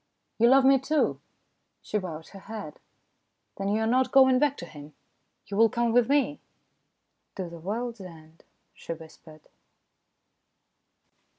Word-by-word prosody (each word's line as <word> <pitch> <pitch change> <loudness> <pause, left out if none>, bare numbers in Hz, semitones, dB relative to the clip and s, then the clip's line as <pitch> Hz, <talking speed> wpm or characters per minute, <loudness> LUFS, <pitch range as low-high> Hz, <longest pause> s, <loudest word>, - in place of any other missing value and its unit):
"You 235 - +5
love 265 +1 +5
me, 270 0 +6
too?" 295 +3 0 0.6
She 210 - -2
bowed 165 -4 -8
her 195 - -12
head. 205 -6 -9 0.4
" - - -51
Then 195 0 -2
you 215 +2 0
are - - +1
not 255 +3 +2
going 260 -2 +6
back 290 -1 +1
to 175 - -7
him? 150 -2 -13 0.5
You 200 - -7
will 225 +1 +5
come 235 +1 0
with 245 0 +3
me? 290 0 +1 0.3
" - - -49
" - - -51
To 185 -2 -4
the 170 0 -10
world's 225 +5 -4
end," 165 -3 -14 0.3
she - - -7
whispered. 160 -1 -15
215 Hz, 160 wpm, -27 LUFS, 170-255 Hz, 0.6 s, me